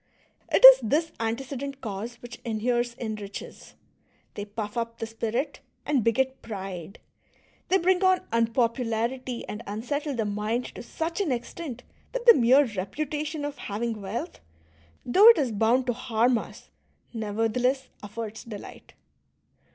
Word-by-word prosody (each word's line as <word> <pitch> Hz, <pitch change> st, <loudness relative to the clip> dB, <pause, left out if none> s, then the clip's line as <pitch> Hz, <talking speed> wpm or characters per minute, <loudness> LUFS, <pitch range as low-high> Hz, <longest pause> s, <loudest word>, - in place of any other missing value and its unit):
It -, -, +7 dB
is -, -, +12 dB
this 320 Hz, +2 st, 0 dB
antecedent 270 Hz, +4 st, -3 dB
cause 225 Hz, 0 st, -5 dB
which 240 Hz, 0 st, -10 dB
inheres 240 Hz, +1 st, -1 dB
in 225 Hz, -3 st, -4 dB
riches; 200 Hz, -1 st, -9 dB, 0.6 s
they 205 Hz, -, -5 dB
puff 210 Hz, +1 st, -6 dB
up 230 Hz, -1 st, -3 dB
the -, -, -3 dB
spirit 230 Hz, +5 st, -3 dB, 0.3 s
and 280 Hz, -6 st, +1 dB
beget 260 Hz, +4 st, +1 dB
pride, 195 Hz, -4 st, -7 dB, 0.7 s
they 380 Hz, -, +4 dB
bring 370 Hz, +1 st, +2 dB
on 370 Hz, -1 st, +4 dB
unpopularity 230 Hz, +1 st, 0 dB
and 210 Hz, -, -6 dB
unsettle 280 Hz, +8 st, -3 dB
the 225 Hz, -2 st, -1 dB
mind 210 Hz, +4 st, -1 dB
to -, -, -8 dB
such 325 Hz, +9 st, -3 dB
an 350 Hz, -8 st, 0 dB
extent 250 Hz, +1 st, -5 dB, 0.3 s
that -, -, -3 dB
the 470 Hz, -, +10 dB
mere 265 Hz, -, +5 dB
reputation 290 Hz, -, -3 dB
of 290 Hz, -1 st, -6 dB
having 220 Hz, +1 st, -3 dB
wealth, 220 Hz, -, -5 dB, 0.7 s
though 390 Hz, -, +6 dB
it 465 Hz, -, +9 dB
is 265 Hz, -6 st, 0 dB
bound 225 Hz, +5 st, +2 dB
to 245 Hz, -, 0 dB
harm 240 Hz, 0 st, +1 dB
us, -, -, -11 dB, 0.4 s
nevertheless 225 Hz, +4 st, 0 dB
affords 215 Hz, +1 st, -6 dB
delight. 220 Hz, -4 st, -10 dB
240 Hz, 140 wpm, -26 LUFS, 220-280 Hz, 0.7 s, is